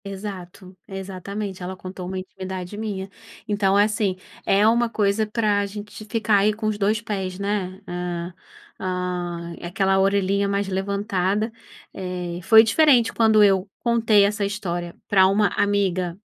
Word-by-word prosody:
Exato, 190 Hz, -2 st, -8 dB
exatamente, 195 Hz, 0 st, -6 dB
ela 180 Hz, +1 st, -5 dB
contou 185 Hz, -1 st, -7 dB
uma 190 Hz, +1 st, -4 dB
intimidade 185 Hz, 0 st, -6 dB
minha. 205 Hz, -3 st, -4 dB, 0.4 s
Então 200 Hz, -2 st, +2 dB
assim, 205 Hz, -2 st, +2 dB, 0.3 s
é 205 Hz, +2 st, +4 dB
uma 235 Hz, +1 st, +3 dB
coisa 210 Hz, 0 st, +1 dB
para 210 Hz, -2 st, +1 dB
gente 210 Hz, +1 st, -9 dB
ficar 215 Hz, -1 st, +1 dB
aí 210 Hz, +2 st, +3 dB
com 215 Hz, +1 st, -6 dB
os 215 Hz, 0 st, +1 dB
dois 210 Hz, +2 st, +2 dB
pés, 195 Hz, -4 st, -4 dB
né, 200 Hz, -2 st, -2 dB
hã, 175 Hz, 0 st, -4 dB, 1.3 s
aquela 190 Hz, +2 st, +1 dB
orelhinha 200 Hz, 0 st, +2 dB
mais 200 Hz, 0 st, 0 dB
levantada, 200 Hz, +2 st, -1 dB, 0.4 s
eh, 180 Hz, -2 st, -5 dB
foi 220 Hz, +5 st, +7 dB
diferente 245 Hz, 0 st, +4 dB
quando 220 Hz, -2 st, +5 dB
eu 195 Hz, -1 st, +3 dB
contei 225 Hz, -3 st, +3 dB
essa 210 Hz, +1 st, -1 dB
história 175 Hz, -4 st, -3 dB
para 190 Hz, -2 st, +5 dB
uma 200 Hz, +1 st, +3 dB
"amiga", 185 Hz, -3 st, 0 dB
200 Hz, 135 wpm, -23 LUFS, 185-210 Hz, 1.3 s, foi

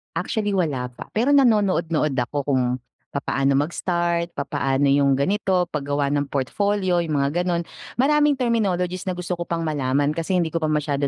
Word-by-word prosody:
Actually, 205 Hz, +4 st, -1 dB
wala 145 Hz, -9 st, 0 dB
pa. -, -, -10 dB
Pero 245 Hz, +7 st, +2 dB
nanonood-nood 185 Hz, -, +2 dB
ako 125 Hz, +3 st, -2 dB
kung 135 Hz, -3 st, +2 dB, 0.5 s
papaano 135 Hz, -1 st, 0 dB
mag-start, 170 Hz, +2 st, -1 dB
papaano 135 Hz, 0 st, 0 dB
yung 140 Hz, -1 st, +4 dB
ganito, 185 Hz, +4 st, +1 dB
paggawa 145 Hz, -1 st, -1 dB
ng 145 Hz, -1 st, -1 dB
portfolio, 185 Hz, +6 st, 0 dB
yung 155 Hz, -3 st, -1 dB
mga 140 Hz, +5 st, +1 dB
gano'n. 175 Hz, -1 st, 0 dB, 0.3 s
Maraming 295 Hz, +2 st, +3 dB
terminologies 190 Hz, -7 st, 0 dB
na 185 Hz, -, -1 dB
gusto 180 Hz, 0 st, -3 dB
ko 170 Hz, -1 st, -3 dB
pang 165 Hz, -1 st, -2 dB
malaman 145 Hz, -1 st, 0 dB
kasi 170 Hz, +3 st, -1 dB
hindi 165 Hz, -2 st, 0 dB
ko 165 Hz, -, -1 dB
pa 155 Hz, -, 0 dB
masyado 145 Hz, -2 st, 0 dB
170 Hz, 165 wpm, -23 LUFS, 145-185 Hz, 0.5 s, yung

